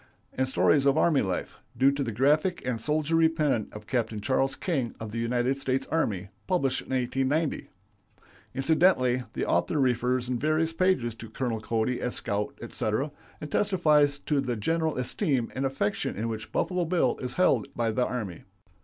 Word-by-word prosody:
and 130 Hz, 0 st, 0 dB
Stories 140 Hz, +1 st, +3 dB
of 140 Hz, +2 st, +4 dB
Army 160 Hz, -3 st, +4 dB
Life," 95 Hz, -3 st, -3 dB, 0.2 s
due 135 Hz, +2 st, +5 dB
to 140 Hz, 0 st, -2 dB
the 115 Hz, -, -3 dB
graphic 150 Hz, -, +2 dB
and 115 Hz, -3 st, -1 dB
soldierly 155 Hz, +3 st, +2 dB
pen 150 Hz, -9 st, 0 dB
of 105 Hz, 0 st, -10 dB
Capt. 115 Hz, -2 st, -1 dB
Charles 135 Hz, +3 st, +1 dB
King 135 Hz, -10 st, -2 dB
of 110 Hz, -2 st, -6 dB
the 115 Hz, -, -3 dB
United 125 Hz, +3 st, 0 dB
States 130 Hz, -1 st, -1 dB
Army, 100 Hz, -, 0 dB, 0.2 s
published 140 Hz, -8 st, +1 dB
in -, -, -16 dB
1890. 135 Hz, +4 st, 0 dB, 0.9 s
Incidentally 135 Hz, -3 st, +3 dB
the -, -, -2 dB
author 155 Hz, -, +1 dB
refers 125 Hz, -1 st, +1 dB
in 125 Hz, -1 st, -1 dB
various 155 Hz, +3 st, +1 dB
pages 165 Hz, -10 st, +1 dB
to 115 Hz, 0 st, -10 dB
Colonel 115 Hz, -1 st, -2 dB
Cody 115 Hz, +3 st, -1 dB
as 125 Hz, -, -2 dB
scout, 100 Hz, +1 st, -3 dB
etc., 120 Hz, +8 st, -2 dB, 0.3 s
and 150 Hz, -, -7 dB
testifies 155 Hz, -8 st, +3 dB
to 145 Hz, -1 st, 0 dB
the 125 Hz, -3 st, -2 dB
general 160 Hz, +8 st, 0 dB
esteem 130 Hz, -, 0 dB
and 135 Hz, +1 st, 0 dB
affection 130 Hz, -6 st, -2 dB
in 110 Hz, +2 st, -2 dB
which 110 Hz, -1 st, -5 dB
Buffalo 180 Hz, -2 st, 0 dB
Bill 165 Hz, -6 st, +1 dB
is 125 Hz, -1 st, -5 dB
held 135 Hz, -, +3 dB
by 115 Hz, -1 st, 0 dB
the 125 Hz, +3 st, +1 dB
army. 105 Hz, -9 st, -4 dB
130 Hz, 170 wpm, -27 LUFS, 115-155 Hz, 0.9 s, due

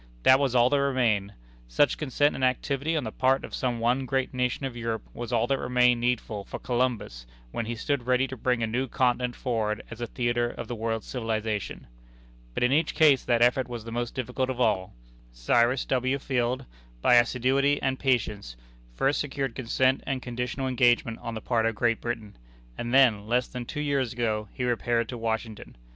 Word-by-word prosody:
That 130 Hz, +1 st, +7 dB
was 135 Hz, -3 st, 0 dB
all 120 Hz, 0 st, +6 dB
that 145 Hz, -1 st, +3 dB
remained. 115 Hz, -7 st, +1 dB, 0.3 s
Such -, -, +2 dB
consent 145 Hz, 0 st, +1 dB
and 130 Hz, -, -4 dB
activity 140 Hz, +4 st, 0 dB
on 150 Hz, -, -1 dB
the 110 Hz, -, -4 dB
part 130 Hz, +3 st, +1 dB
of -, -, -12 dB
some 125 Hz, -2 st, -1 dB
one 125 Hz, +3 st, +1 dB
great 130 Hz, +1 st, -1 dB
nation 125 Hz, +2 st, -1 dB
of 130 Hz, -3 st, -5 dB
Europe 115 Hz, -2 st, -3 dB
was 120 Hz, 0 st, -6 dB
all 115 Hz, -1 st, +2 dB
that 135 Hz, +2 st, 0 dB
remained 125 Hz, -1 st, +3 dB
needful 115 Hz, -4 st, -1 dB
for -, -, -7 dB
Columbus 120 Hz, -, -2 dB, 0.2 s
when 115 Hz, -, -3 dB
he 120 Hz, -, -3 dB
stood 125 Hz, +1 st, -2 dB
ready 130 Hz, +1 st, +3 dB
to 130 Hz, -, -7 dB
bring 125 Hz, -1 st, 0 dB
a -, -, +3 dB
new 125 Hz, +4 st, -1 dB
continent 125 Hz, 0 st, 0 dB
forward 110 Hz, -4 st, -2 dB
as 115 Hz, +1 st, -8 dB
a 120 Hz, -, -2 dB
theatre 120 Hz, 0 st, 0 dB
of -, -, -7 dB
the 120 Hz, -, -4 dB
world's 115 Hz, -1 st, -3 dB
civilization. 110 Hz, -4 st, -3 dB, 0.7 s
But -, -, 0 dB
in 125 Hz, -, +3 dB
each 155 Hz, +3 st, +1 dB
case 145 Hz, -5 st, +5 dB
that 120 Hz, -1 st, +3 dB
effort 125 Hz, +1 st, +3 dB
was 120 Hz, -2 st, -6 dB
the 115 Hz, -, -8 dB
most 120 Hz, +1 st, -3 dB
difficult 130 Hz, +1 st, -2 dB
of 130 Hz, -1 st, -3 dB
all. 95 Hz, -6 st, +1 dB, 0.4 s
Cyrus 120 Hz, -, +2 dB
W. 130 Hz, +1 st, 0 dB
Field, 125 Hz, -2 st, -1 dB, 0.4 s
by -, -, +5 dB
assiduity 130 Hz, +4 st, +2 dB
and 130 Hz, -1 st, -1 dB
patience, 105 Hz, -, -1 dB, 0.4 s
first 135 Hz, -, +1 dB
secured 135 Hz, -3 st, -3 dB
consent 130 Hz, +2 st, +1 dB
and 135 Hz, -2 st, -1 dB
conditional 125 Hz, +2 st, -3 dB
engagement 120 Hz, -3 st, +2 dB
on 115 Hz, -, -5 dB
the 110 Hz, -, -5 dB
part 115 Hz, -1 st, +1 dB
of 115 Hz, -, -1 dB
Great 115 Hz, +1 st, +1 dB
Britain, 115 Hz, -3 st, -5 dB, 0.4 s
and 120 Hz, -, -4 dB
then, 120 Hz, -6 st, +4 dB
less 125 Hz, +2 st, +1 dB
than 125 Hz, -1 st, -6 dB
two 150 Hz, +5 st, -4 dB
years 140 Hz, -5 st, 0 dB
ago, 110 Hz, -3 st, -1 dB
he 125 Hz, -, -5 dB
repaired 120 Hz, -1 st, 0 dB
to 125 Hz, -, -5 dB
Washington. 110 Hz, -, -4 dB
120 Hz, 195 wpm, -27 LUFS, 115-130 Hz, 0.7 s, That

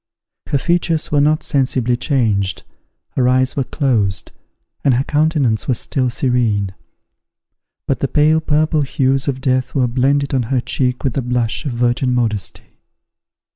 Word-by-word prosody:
Her 140 Hz, -, +1 dB
features 165 Hz, +1 st, 0 dB
were 145 Hz, -1 st, +3 dB
not 155 Hz, +2 st, +2 dB
sensibly 130 Hz, -4 st, 0 dB
changed, 110 Hz, -8 st, 0 dB, 0.5 s
her 125 Hz, -1 st, +1 dB
eyes 130 Hz, +1 st, +2 dB
were 140 Hz, -, 0 dB
closed, 115 Hz, -, -1 dB, 0.5 s
and 135 Hz, -3 st, +3 dB
her 130 Hz, -, +1 dB
countenance 145 Hz, -7 st, +1 dB
was 125 Hz, -, 0 dB
still 130 Hz, -2 st, -1 dB
serene; 115 Hz, -6 st, 0 dB, 1.1 s
but 135 Hz, -, -1 dB
the 140 Hz, -, 0 dB
pale 155 Hz, +3 st, +3 dB
purple 155 Hz, 0 st, +1 dB
hues 135 Hz, 0 st, 0 dB
of 130 Hz, -2 st, -2 dB
death 130 Hz, +1 st, 0 dB
were 130 Hz, -3 st, +2 dB
blended 140 Hz, +3 st, +1 dB
on 130 Hz, -, +2 dB
her 135 Hz, -2 st, +1 dB
cheek 125 Hz, 0 st, -2 dB
with 135 Hz, -4 st, 0 dB
the 135 Hz, -, -1 dB
blush 125 Hz, +3 st, -1 dB
of 130 Hz, -, -3 dB
virgin 120 Hz, +1 st, +1 dB
modesty. 110 Hz, -5 st, -3 dB
130 Hz, 150 wpm, -18 LUFS, 120-145 Hz, 1.1 s, were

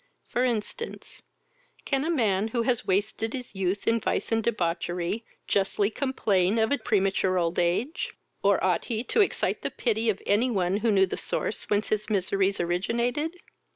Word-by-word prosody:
For 245 Hz, -, 0 dB
instance, 245 Hz, -, -3 dB, 0.6 s
can 275 Hz, -1 st, 0 dB
a 320 Hz, -, -1 dB
man, 215 Hz, -, +2 dB
who 230 Hz, +1 st, -1 dB
has 245 Hz, -1 st, 0 dB
wasted 215 Hz, +4 st, 0 dB
his 255 Hz, -2 st, -5 dB
youth 190 Hz, +1 st, -2 dB
in 230 Hz, 0 st, +3 dB
vice -, -, -1 dB
and 225 Hz, 0 st, +2 dB
debauchery, 175 Hz, 0 st, -1 dB, 0.2 s
justly 200 Hz, +1 st, +1 dB
complain 215 Hz, -7 st, +1 dB
of 220 Hz, +2 st, +2 dB
a 285 Hz, -, +2 dB
premature 195 Hz, -4 st, +1 dB
old 170 Hz, -1 st, 0 dB
age? 185 Hz, -, 0 dB, 0.3 s
or 200 Hz, -1 st, +3 dB
ought 180 Hz, -2 st, +2 dB
he 225 Hz, -1 st, -2 dB
to 435 Hz, -, +2 dB
excite 400 Hz, -, 0 dB
the -, -, -1 dB
pity 225 Hz, -1 st, 0 dB
of 205 Hz, -, 0 dB
any 225 Hz, +5 st, +3 dB
one 190 Hz, -4 st, +1 dB
who 230 Hz, +2 st, +1 dB
knew 195 Hz, -2 st, +5 dB
the 185 Hz, -, -5 dB
source -, -, -2 dB
whence 205 Hz, 0 st, +1 dB
his 215 Hz, 0 st, 0 dB
miseries 195 Hz, 0 st, +1 dB
originated? 235 Hz, -, 0 dB
215 Hz, 170 wpm, -27 LUFS, 190-235 Hz, 0.6 s, knew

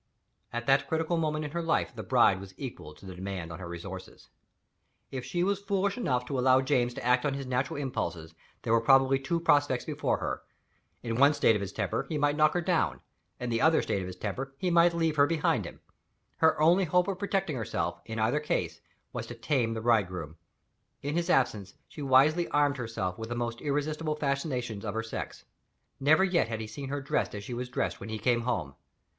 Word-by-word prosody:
At 120 Hz, 0 st, -4 dB
that 135 Hz, +2 st, +3 dB
critical 160 Hz, +1 st, 0 dB
moment 155 Hz, -2 st, -1 dB
in 145 Hz, -, -5 dB
her 170 Hz, +2 st, -2 dB
life 165 Hz, -6 st, 0 dB
the 110 Hz, -, -5 dB
bride 110 Hz, -5 st, +4 dB
was 95 Hz, -1 st, -11 dB
equal 115 Hz, -, -7 dB
to 100 Hz, -, -15 dB
the 95 Hz, -, -7 dB
demand 90 Hz, -2 st, -5 dB
on 80 Hz, -, -7 dB
her 90 Hz, -, -7 dB
resources. 90 Hz, +2 st, -9 dB, 0.8 s
If 130 Hz, -2 st, -4 dB
she 175 Hz, +5 st, -1 dB
was 200 Hz, +1 st, 0 dB
foolish 200 Hz, 0 st, 0 dB
enough 125 Hz, -, 0 dB
to 130 Hz, +1 st, -2 dB
allow 130 Hz, +1 st, +5 dB
James 125 Hz, -3 st, +1 dB
to -, -, -6 dB
act 125 Hz, 0 st, +3 dB
on 140 Hz, -2 st, 0 dB
his 140 Hz, -1 st, -5 dB
natural 130 Hz, +2 st, -1 dB
impulses, 85 Hz, -, -3 dB, 0.3 s
there 115 Hz, -, +1 dB
were 115 Hz, -, +4 dB
probably 135 Hz, +2 st, +5 dB
two 150 Hz, +5 st, -1 dB
prospects 145 Hz, -6 st, +2 dB
before -, -, -1 dB
her. -, -, -3 dB, 0.6 s
In 115 Hz, -1 st, -2 dB
one 140 Hz, +3 st, +5 dB
state 145 Hz, -5 st, +4 dB
of 105 Hz, -, -1 dB
his 100 Hz, -, -4 dB
temper, -, -, -2 dB
he 155 Hz, -, -1 dB
might 145 Hz, 0 st, +2 dB
knock 155 Hz, +1 st, +3 dB
her 175 Hz, -, +2 dB
down. -, -, 0 dB, 0.4 s
In 125 Hz, -1 st, -2 dB
another 160 Hz, +8 st, +3 dB
state 100 Hz, -, -1 dB
of 90 Hz, -, -5 dB
his 90 Hz, -, -7 dB
temper, 130 Hz, +8 st, -5 dB
he 180 Hz, +4 st, -1 dB
might 170 Hz, 0 st, +5 dB
leave 165 Hz, -2 st, 0 dB
her 145 Hz, 0 st, +6 dB
behind 165 Hz, -1 st, +1 dB
him. -, -, -10 dB, 0.6 s
Her 160 Hz, -1 st, +3 dB
only 175 Hz, +5 st, +5 dB
hope 180 Hz, +3 st, +2 dB
of 195 Hz, -2 st, -3 dB
protecting 195 Hz, -5 st, -1 dB
herself, 115 Hz, -4 st, -3 dB
in 110 Hz, -, -6 dB
either 115 Hz, +7 st, +2 dB
case, 150 Hz, -, -2 dB, 0.3 s
was -, -, -4 dB
to 120 Hz, -, -7 dB
tame 115 Hz, -1 st, 0 dB
the 110 Hz, -, -3 dB
bridegroom. 90 Hz, -9 st, 0 dB, 0.7 s
In 145 Hz, +2 st, -2 dB
his 170 Hz, +1 st, 0 dB
absence, 105 Hz, -, +1 dB
she 150 Hz, -, -10 dB
wisely 145 Hz, +5 st, +4 dB
armed 145 Hz, -1 st, +2 dB
herself 115 Hz, -5 st, -3 dB
with 110 Hz, 0 st, -5 dB
the 120 Hz, -, -3 dB
most 120 Hz, -1 st, -3 dB
irresistible 150 Hz, +2 st, -1 dB
fascinations 140 Hz, -7 st, -2 dB
of 105 Hz, -1 st, -4 dB
her 115 Hz, -, -1 dB
sex. 115 Hz, -, -6 dB, 0.5 s
Never 155 Hz, +6 st, +5 dB
yet 180 Hz, -7 st, +2 dB
had 115 Hz, -1 st, -4 dB
he 110 Hz, -, -4 dB
seen 130 Hz, +6 st, -7 dB
her 145 Hz, 0 st, -2 dB
dressed 135 Hz, -, -1 dB
as 100 Hz, -, -6 dB
she 120 Hz, -, -6 dB
was 125 Hz, +1 st, -4 dB
dressed 125 Hz, -, -2 dB
when 100 Hz, -, -8 dB
he 110 Hz, -, -3 dB
came 120 Hz, +3 st, +1 dB
home. 105 Hz, -, -2 dB
130 Hz, 215 wpm, -29 LUFS, 110-155 Hz, 0.8 s, her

